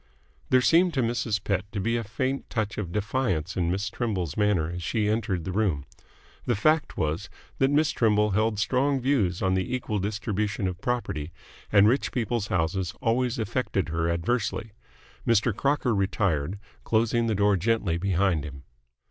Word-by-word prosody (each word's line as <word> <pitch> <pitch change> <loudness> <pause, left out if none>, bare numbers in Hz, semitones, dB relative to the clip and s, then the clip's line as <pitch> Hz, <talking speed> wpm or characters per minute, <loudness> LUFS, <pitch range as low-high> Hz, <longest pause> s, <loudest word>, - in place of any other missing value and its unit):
There 130 0 +5
seemed 170 +4 +4
to 130 - +2
Mrs. 115 -3 -1
Pett 100 0 -2
to 105 - -3
be 115 +5 0
a 115 - -1
faint 130 +6 -3
touch 110 -2 -2
of 90 -5 -4
defiance 105 -5 -1
in 85 -2 0
Miss 95 +3 -1
Trimble's 95 - -2
manner 100 -6 +1
as 90 0 -5
she 105 +5 0
entered 105 -5 0
the 95 - -4
room. 90 -9 0 0.6
The - - +1
fact 155 +8 +1
was 80 +1 -1 0.3
that 135 - +4
Miss 150 +2 +3
Trimble 105 -2 +2
held 110 +2 +1
strong 135 +6 +1
views 115 -10 +1
on 95 0 +2
the 95 +6 0
equal 110 -4 -2
distribution 105 0 -2
of 90 0 -5
property, 85 -11 -2 0.4
and 100 0 +6
rich 130 +5 +1
people's 115 -3 -1
houses 90 0 -1
always 125 +2 +1
affected 110 - -1
her 80 +1 0
adversely. 110 +5 -1 0.6
Mr. 115 -1 +3
Crocker 140 -1 +1
retired, 95 -4 0 0.3
closing 115 +1 +1
the 110 - +1
door 100 0 +3
gently 100 -3 0
behind 95 -4 +1
him. 70 -2 -8
105 Hz, 165 wpm, -26 LUFS, 95-120 Hz, 0.6 s, and